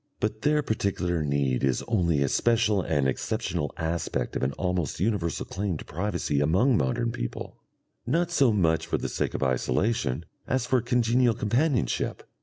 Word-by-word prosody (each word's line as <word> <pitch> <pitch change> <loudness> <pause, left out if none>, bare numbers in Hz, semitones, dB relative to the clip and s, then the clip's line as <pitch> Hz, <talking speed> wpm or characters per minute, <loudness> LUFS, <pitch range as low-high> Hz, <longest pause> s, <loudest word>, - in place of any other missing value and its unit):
But 110 0 -2
their 150 0 +2
particular 90 - -1
need 70 -3 0
is 65 -1 +1
only 85 -10 +2
a - - +1
special 110 - +2
and 75 -5 +1
exceptional 75 +3 -2
aspect 80 +1 -2
of - - -1
an 65 - +1
almost 90 -4 -2
universal 95 -4 -1
claim 95 -3 -3
to - - -9
privacy 85 -4 -1
among 95 - +3
modern 100 - 0
people, - - -5 0.5
not 170 +6 +1
so 140 -8 +4
much 80 -6 +1
for - - 0
the - - -3
sake - - -2
of - - -1
isolation 65 - 0 0.2
as 130 -2 0
for 125 0 +2
congenial 120 0 +2
companionship. 120 - 0
95 Hz, 160 wpm, -27 LUFS, 75-115 Hz, 0.5 s, so